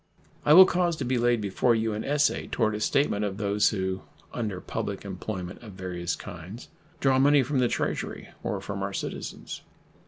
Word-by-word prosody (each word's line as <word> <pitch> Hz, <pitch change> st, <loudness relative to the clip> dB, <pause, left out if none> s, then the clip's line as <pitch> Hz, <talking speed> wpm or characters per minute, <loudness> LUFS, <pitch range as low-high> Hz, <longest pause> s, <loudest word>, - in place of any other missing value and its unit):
I 150 Hz, -, +8 dB
will 185 Hz, +3 st, +11 dB
cause 175 Hz, -2 st, +1 dB
to 140 Hz, -, -4 dB
be 125 Hz, 0 st, +1 dB
laid 120 Hz, -1 st, +2 dB
before 105 Hz, +4 st, +2 dB
you 110 Hz, -1 st, 0 dB
an 105 Hz, -, -3 dB
essay 145 Hz, +1 st, +1 dB
toward 110 Hz, -3 st, +1 dB
a 105 Hz, -, -3 dB
statement 105 Hz, -2 st, +1 dB
of 100 Hz, -2 st, -2 dB
those 105 Hz, 0 st, +2 dB
who, 95 Hz, -2 st, -2 dB, 0.3 s
under 105 Hz, -6 st, -3 dB
public 100 Hz, -1 st, -4 dB
employment 95 Hz, -1 st, -5 dB
of 110 Hz, -4 st, -10 dB
various 90 Hz, -2 st, -3 dB
kinds, 95 Hz, +4 st, -9 dB, 0.3 s
draw 135 Hz, -1 st, +3 dB
money 140 Hz, 0 st, +5 dB
from 135 Hz, +1 st, 0 dB
the 125 Hz, -, +4 dB
Treasury -, -, -3 dB
or -, -, -3 dB
from -, -, -5 dB
our -, -, -3 dB
citizens. -, -, -5 dB
110 Hz, 185 wpm, -27 LUFS, 95-130 Hz, 0.3 s, will